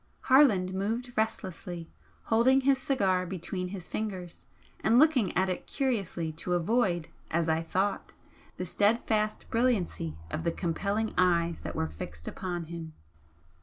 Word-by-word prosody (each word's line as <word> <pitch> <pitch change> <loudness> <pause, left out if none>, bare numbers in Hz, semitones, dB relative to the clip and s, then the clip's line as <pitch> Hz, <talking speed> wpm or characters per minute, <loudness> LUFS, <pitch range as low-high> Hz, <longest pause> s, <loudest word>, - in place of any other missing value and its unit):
Harland 225 -10 +5
moved 225 +6 -2
restlessly, 185 -6 -3 0.4
holding 255 +4 +4
his 270 0 +3
cigar 195 -10 +1
between 180 0 -4
his 180 -2 -7
fingers 190 -5 -5 0.3
and 225 +2 +3
looking 270 -8 +5
at 190 +1 +3
it 185 - -3
curiously 200 - -1
to 165 +3 -3
avoid, 175 -2 +1 0.2
as 165 0 +1
I 160 0 +2
thought, 190 +4 -1 0.5
the 180 - -3
steadfast 215 +2 +1
brilliancy 210 - 0
of 160 - -3
the 170 - +1
compelling 200 +6 -1
eyes 170 -2 +2
that 85 - -6
were 80 - 0
fixed 75 0 -8
upon 175 -2 -4
him. 165 -1 -7
185 Hz, 135 wpm, -29 LUFS, 170-225 Hz, 0.5 s, Harland